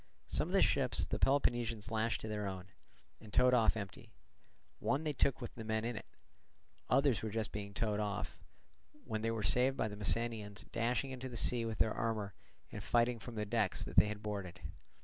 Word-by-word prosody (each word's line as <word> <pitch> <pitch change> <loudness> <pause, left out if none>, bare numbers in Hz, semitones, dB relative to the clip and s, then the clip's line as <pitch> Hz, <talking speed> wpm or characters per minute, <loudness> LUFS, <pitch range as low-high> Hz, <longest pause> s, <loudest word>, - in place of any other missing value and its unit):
Some - - 0
of - - -4
the - - +6
ships - - +3
the - - -3
Peloponnesians 120 -5 +1
lashed 110 +1 0
to - - -5
their 105 -1 -2
own, 95 -2 -5 0.5
and 105 - -13
towed 125 +3 +5
off 115 -2 +4
empty; 100 -3 -7 0.7
one 140 +3 0
they 155 -1 -1
took 135 -1 +2
with 120 - -6
the 115 - -7
men 110 0 -1
in 120 0 -2
it; - - -7 0.8
others 140 -4 +4
were 110 - -2
just 110 0 -2
being 100 -1 -5
towed 110 -3 0
off, 105 -2 -3 0.7
when 110 -2 -2
they 115 - 0
were 115 -2 -2
saved 125 +8 +3
by - - +1
the 105 - -6
Messenians 105 0 -1
dashing 120 +3 0
into 130 0 -5
the 120 - -6
sea 120 0 +1
with 110 -2 -3
their 110 - +2
armour 110 -3 -2 0.4
and - - -6
fighting 120 0 +2
from 120 +1 -8
the 105 -1 -1
decks 105 -2 +1
that - - -7
they - - +7
had 105 0 -5
boarded. 100 -5 -5
110 Hz, 205 wpm, -35 LUFS, 105-120 Hz, 0.8 s, they